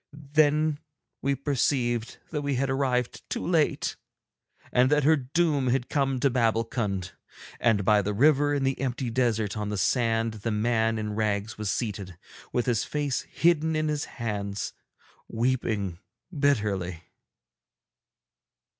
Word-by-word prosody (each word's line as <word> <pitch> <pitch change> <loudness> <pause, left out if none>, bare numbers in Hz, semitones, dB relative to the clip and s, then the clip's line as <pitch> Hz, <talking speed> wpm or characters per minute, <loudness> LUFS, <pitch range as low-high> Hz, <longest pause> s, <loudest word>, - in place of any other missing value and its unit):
Then 155 0 +3 0.4
we 140 0 +1
perceived 125 -4 0
that 150 -3 -2
we 140 -1 -1
had 135 +1 0
arrived 130 -2 0
too - - -3
late, 165 -3 +1 0.7
and 125 +1 +4
that 150 0 +3
her 160 +3 +6
doom 145 0 +1
had 125 0 0
come 135 -3 +1
to 140 - +3
Babbulkund; 115 -5 0 0.5
and 105 -5 +2
by 105 0 +5
the 105 +1 -2
river 145 +4 +4
in 140 - 0
the 135 0 0
empty 130 -2 -2
desert 115 -4 0
on 105 -1 -3
the 105 - -2
sand 115 0 +1
the 115 - -1
man 115 +1 +1
in 105 -1 -3
rags 105 0 -1
was 105 -2 -2
seated, 100 -6 -3 0.3
with 120 - 0
his 115 -3 +1
face 145 -3 -1
hidden 160 -1 +2
in 155 0 0
his 150 -1 -1
hands, 105 -4 -4 0.5
weeping 110 -7 -1 0.4
bitterly. 105 - 0
120 Hz, 135 wpm, -27 LUFS, 110-140 Hz, 0.7 s, her